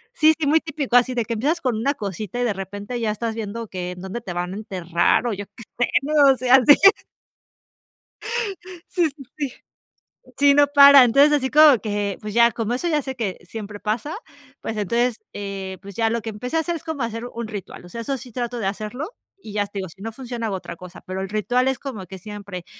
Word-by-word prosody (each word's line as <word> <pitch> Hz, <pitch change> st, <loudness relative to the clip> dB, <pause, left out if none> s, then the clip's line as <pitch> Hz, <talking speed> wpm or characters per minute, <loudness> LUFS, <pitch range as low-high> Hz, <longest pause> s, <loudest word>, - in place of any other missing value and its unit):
Sí, 315 Hz, 0 st, +5 dB
sí, 310 Hz, -, 0 dB
muy 310 Hz, +3 st, +5 dB
típico, 290 Hz, -5 st, -3 dB
así 250 Hz, +1 st, +2 dB
de 235 Hz, -2 st, 0 dB
que 230 Hz, -, -3 dB
empiezas 285 Hz, +10 st, 0 dB
con 255 Hz, -3 st, 0 dB
una 275 Hz, +6 st, 0 dB
cosita 205 Hz, +1 st, -5 dB
y -, -, +1 dB
de 230 Hz, -4 st, +1 dB
repente 205 Hz, +5 st, -6 dB
ya 225 Hz, -2 st, 0 dB
estás 225 Hz, +2 st, -3 dB
viendo 225 Hz, +1 st, -5 dB
que 180 Hz, -2 st, -5 dB
en 180 Hz, -, -9 dB
dónde 190 Hz, +5 st, -5 dB
te 195 Hz, -, -7 dB
van 180 Hz, +1 st, -3 dB
a -, -, -6 dB
enterrar 180 Hz, -1 st, +1 dB
o 235 Hz, -, 0 dB
yo 205 Hz, 0 st, -5 dB
qué 230 Hz, -, -11 dB, 0.2 s
sé, -, -, -10 dB
¿no? 300 Hz, -, -3 dB, 0.2 s
O -, -, -7 dB
sea, 255 Hz, +1 st, +6 dB
sí. 290 Hz, -, +10 dB, 2.2 s
Sí, 345 Hz, -3 st, +2 dB
sí, 280 Hz, -1 st, -13 dB
sí. 285 Hz, -4 st, -3 dB, 0.9 s
Sí, 280 Hz, 0 st, +6 dB
no 290 Hz, 0 st, +6 dB
paran. 280 Hz, -2 st, +9 dB
Entonces, 275 Hz, +5 st, +5 dB
así 265 Hz, -3 st, +1 dB
como 300 Hz, -3 st, +8 dB
que, 205 Hz, -1 st, -2 dB
pues, 210 Hz, -1 st, -6 dB
ya, 235 Hz, +1 st, +5 dB
como 225 Hz, +1 st, -2 dB
eso 260 Hz, +8 st, -2 dB
ya 305 Hz, -3 st, +1 dB
sé 265 Hz, 0 st, -5 dB
que 215 Hz, -7 st, -3 dB
siempre 210 Hz, 0 st, -7 dB
pasa, 225 Hz, +9 st, -2 dB, 0.5 s
pues, 225 Hz, -, -4 dB
entonces, 235 Hz, +3 st, 0 dB, 0.2 s
eh, 195 Hz, -2 st, -5 dB
pues 200 Hz, -1 st, -10 dB
ya 225 Hz, +1 st, +1 dB
lo 230 Hz, +1 st, -1 dB
que 225 Hz, -, -5 dB
empecé 250 Hz, +8 st, -3 dB
a -, -, +3 dB
hacer 345 Hz, +2 st, -2 dB
es 325 Hz, -, -7 dB
como 315 Hz, -5 st, -3 dB
hacer 230 Hz, 0 st, -4 dB
un 235 Hz, -1 st, -5 dB
ritual, 205 Hz, -4 st, -8 dB
o -, -, -12 dB
sea, 230 Hz, +6 st, -6 dB
eso 270 Hz, +4 st, -2 dB
sí 250 Hz, 0 st, -11 dB
trato 245 Hz, +1 st, -3 dB
de 225 Hz, -, -3 dB
hacerlo, 215 Hz, +8 st, -3 dB, 0.3 s
y 220 Hz, -, -11 dB
ya 205 Hz, -1 st, -1 dB
te 200 Hz, -, -4 dB
digo, 190 Hz, -2 st, -5 dB
si 175 Hz, -, -17 dB
no 225 Hz, +2 st, -4 dB
funciona 240 Hz, -1 st, -5 dB
hago 200 Hz, -, -2 dB
otra 175 Hz, -2 st, -7 dB
cosa, 180 Hz, 0 st, -11 dB
pero 185 Hz, +1 st, -4 dB
el 190 Hz, -, -4 dB
ritual 245 Hz, +5 st, +1 dB
es 265 Hz, -1 st, +1 dB
como 220 Hz, -10 st, -7 dB
que 190 Hz, +1 st, -9 dB
siempre 200 Hz, -2 st, -8 dB
230 Hz, 235 wpm, -22 LUFS, 200-265 Hz, 2.2 s, sí